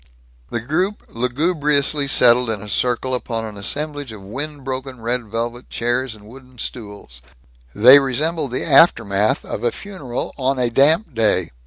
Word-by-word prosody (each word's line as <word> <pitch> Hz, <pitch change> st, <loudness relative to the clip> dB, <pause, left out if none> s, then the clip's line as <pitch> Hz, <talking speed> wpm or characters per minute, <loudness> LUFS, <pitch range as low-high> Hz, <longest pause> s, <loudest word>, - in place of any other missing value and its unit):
The 120 Hz, -, -3 dB
group 180 Hz, -, -2 dB
lugubriously 145 Hz, +3 st, 0 dB
settled 125 Hz, -2 st, +4 dB
in 110 Hz, -2 st, -2 dB
a -, -, -9 dB
circle 125 Hz, +4 st, -1 dB
upon 115 Hz, -3 st, -3 dB
an 105 Hz, -1 st, -8 dB
assemblage 145 Hz, +5 st, -4 dB
of 105 Hz, -3 st, -11 dB
wind 145 Hz, +8 st, -6 dB
broken 130 Hz, -1 st, -6 dB
red 120 Hz, +1 st, -1 dB
velvet 120 Hz, +3 st, -5 dB
chairs 120 Hz, 0 st, -2 dB
and 105 Hz, -1 st, -17 dB
wooden 130 Hz, +2 st, -15 dB
stools. 100 Hz, -, -8 dB, 0.5 s
They 125 Hz, +7 st, +8 dB
resembled 145 Hz, +3 st, -1 dB
the 125 Hz, -, -2 dB
aftermath 110 Hz, -, +3 dB
of -, -, -6 dB
a 120 Hz, -, +1 dB
funeral 160 Hz, -, -6 dB
on 135 Hz, +1 st, 0 dB
a 125 Hz, -2 st, 0 dB
damp 155 Hz, -, +3 dB
day. 105 Hz, -6 st, +1 dB
125 Hz, 155 wpm, -19 LUFS, 115-145 Hz, 0.5 s, They